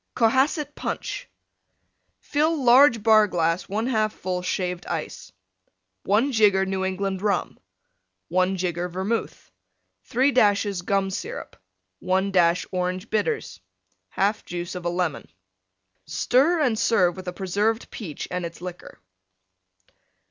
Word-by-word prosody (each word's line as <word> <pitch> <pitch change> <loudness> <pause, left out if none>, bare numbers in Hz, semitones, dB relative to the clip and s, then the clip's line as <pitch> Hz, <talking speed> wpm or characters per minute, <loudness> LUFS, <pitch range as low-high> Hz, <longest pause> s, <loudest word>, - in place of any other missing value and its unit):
COHASSET 265 +5 +2
PUNCH - - -5 0.9
Fill 305 0 0
large 245 -2 +6
Bar 215 -1 +6
glass 165 -1 0
1/2 215 +1 0
full 180 -3 -4
Shaved 180 -1 -3
Ice. 160 - -5 0.7
1 225 +8 +2
jigger 205 -5 +4
New 190 0 -2
England 190 0 -2
Rum. 200 -3 -1 0.7
1 185 +2 +1
jigger 175 -1 -2
Vermouth. 190 +6 -3 0.5
3 265 +3 +2
dashes 205 -5 +2
Gum 195 +1 0
Syrup. - - -6 0.4
1 190 +2 0
dash 175 -2 +3
Orange 185 +2 -3
Bitters. 440 - -1 0.6
1/2 205 +2 +1
juice 175 0 -5
of 180 -1 -7
a - - +1
Lemon 175 -3 -2 0.8
Stir 265 - +2
and 245 -8 +1
serve 180 -7 +3
with 185 -1 -9
a - - -1
Preserved 205 +5 -1
Peach 170 -10 -6
and 180 0 -2
its 170 0 -7
liquor. 180 0 -9
195 Hz, 120 wpm, -24 LUFS, 180-225 Hz, 0.9 s, large